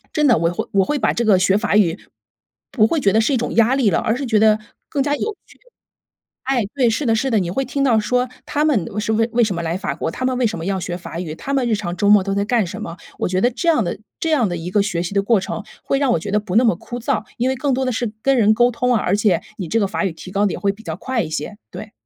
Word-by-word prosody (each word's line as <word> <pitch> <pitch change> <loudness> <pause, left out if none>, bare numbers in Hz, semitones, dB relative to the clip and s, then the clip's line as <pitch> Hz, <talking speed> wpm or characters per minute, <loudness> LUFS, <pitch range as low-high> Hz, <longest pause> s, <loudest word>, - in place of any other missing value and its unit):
真 300 -1 +3
的， 245 - +5
我 165 +1 +1
会 175 - -4
我 195 -1 +3
会 295 - -1
把 - - +2
这 235 - -1
个 200 -4 +5
学 190 +2 +3
法 210 -1 0
语 180 -6 +3 0.7
不 215 -5 +4
会 320 - 0
觉 200 - +3
得 220 - +3
是 230 +6 +2
一 - - +3
种 240 - -3
压 230 +3 +4
力 260 -6 +3
了， 180 - +1
而 220 - 0
是 275 +2 -3
觉 225 -3 +2
得 215 0 +4 0.3
更 280 - -1
加 290 +1 +1
有 430 +7 -3
趣。 - - -20 0.8
哎， 260 -4 0
对， 255 -4 +3
是 255 +6 -1
的 225 -2 +3
是 265 +4 0
的， 220 - +3
你 180 -3 -2
会 270 +9 -1
听 275 +2 -2
到 240 -4 +4
说 250 +4 0 0.2
他 295 +1 0
们 255 - +2
为 210 - -3
是 220 +1 -1
为 225 +1 +2
为 240 0 +4
什 210 -4 0
么 170 - -3
来 165 +2 -2
法 145 -7 -3
国？ 160 - -3
他 255 - -4
们 255 -1 0
为 250 - +1
什 210 -6 -5
么 165 - -5
要 195 0 -1
学 175 -1 -4
法 170 -2 -7
语？ 165 -4 -5
他 275 +11 -5
们 265 -3 +1
日 - - +2
常 180 -4 -4
周 205 +3 +2
末 205 -1 +7
都 195 +1 -2
在 200 - +1
干 220 -3 +1
什 210 +5 -7
么？ 170 -5 -6 0.2
我 - - 0
觉 185 0 0
得 245 - +4
这 335 +8 -1
样 310 -9 +3
的 175 - -3 0.2
这 325 - -1
样 265 -8 +3
的 175 - -3
一 165 +2 -5
个 205 +1 +3
学 180 -5 -2
习 180 - -5
的 200 0 +2
过 220 0 +3
程， 195 +3 -5 0.2
会 275 - 0
让 275 -3 +2
我 - - +1
觉 185 - -6
得 210 - +2
不 205 -3 -5
那 240 - +5
么 225 - +3
枯 240 +7 -7
燥， 240 -2 -1
因 250 +2 +1
为 265 - 0
更 270 +1 0
多 260 +1 0
的 255 - 0
是 235 -2 -2
跟 275 +3 +3
人 215 -2 +5
沟 240 +2 +4
通 250 +2 0
啊， 215 - +1
而 185 - +1
且 205 -5 +2 0.2
你 185 -6 -4
这 225 - +1
个 200 - +1
法 190 - -2
语 190 - 0
提 175 +3 -11
高 200 +1 +1
得 200 - +1
也 - - -5
会 200 - +1
比 220 +2 -16
较 160 -5 -4
快 255 +1 -2
一 160 - -6
些， 155 +6 -4
对。 - - -8
215 Hz, 345 characters per minute, -20 LUFS, 190-250 Hz, 0.8 s, 末